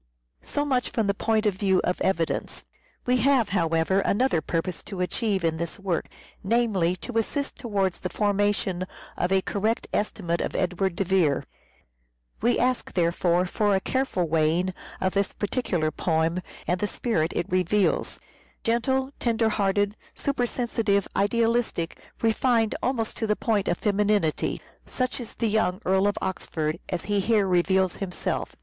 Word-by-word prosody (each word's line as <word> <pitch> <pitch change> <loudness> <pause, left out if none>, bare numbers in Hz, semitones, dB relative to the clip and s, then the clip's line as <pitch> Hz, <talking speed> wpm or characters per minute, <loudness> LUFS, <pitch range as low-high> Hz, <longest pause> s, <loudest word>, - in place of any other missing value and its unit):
So 290 - -2
much 255 -4 +1
from 225 - 0
the 200 - +2
point 220 +1 +1
of 210 - +3
view 190 0 +2
of 180 - -1
evidence. 170 -4 -1 0.4
We 250 0 +3
have, 255 -1 +3
however, 165 0 +2
another 205 -3 +2
purpose 165 +3 -2
to 195 -3 -7
achieve 195 +1 0
in 160 -1 +1
this 170 0 -4
work; 190 -4 -2 0.4
namely, 195 -5 +2
to 225 +5 -2
assist 280 +5 -2
towards 200 -7 -1
the 180 - -3
formation 205 -3 0 0.3
of 175 - -1
a 190 -1 +3
correct 215 +3 -1
estimate 175 -5 -1
of - - -3
Edward 185 0 0
de 195 - 0
Vere. 175 -7 +2 1.0
We 240 +3 +3
ask, 255 0 0
there 170 -2 +2
fore, 175 +1 +2
for 205 +2 +1
a - - +3
careful 260 -6 0
weighing 165 +4 +1 0.3
of 185 0 0
this 200 0 0
particular 190 -8 -1
poem 165 +2 0 0.2
and 180 +1 0
the 210 - 0
spirit 185 -9 0
it 170 - 0
reveals. 185 +3 +1 0.4
Gentle, 265 +3 +1
tender 230 -2 +2
hearted, 205 0 +1 0.2
supersensitive, 235 -6 0
idealistic, 225 -4 +1 0.2
refined 225 0 +2
almost 235 -4 -1
to 225 - -1
the 210 - +2
point 210 -3 0
of 175 - +1
femininity; 205 -5 +1 0.3
such 255 0 -2
is 235 -3 -7
the 230 - 0
young 205 -4 +1
Earl 190 +2 +3
of 205 +1 0
Oxford 160 -3 -2
as 180 -2 -2
he 205 -1 0
here 210 +1 +3
reveals 185 0 +2
himself. 190 -3 -3
200 Hz, 155 wpm, -26 LUFS, 180-225 Hz, 1.0 s, of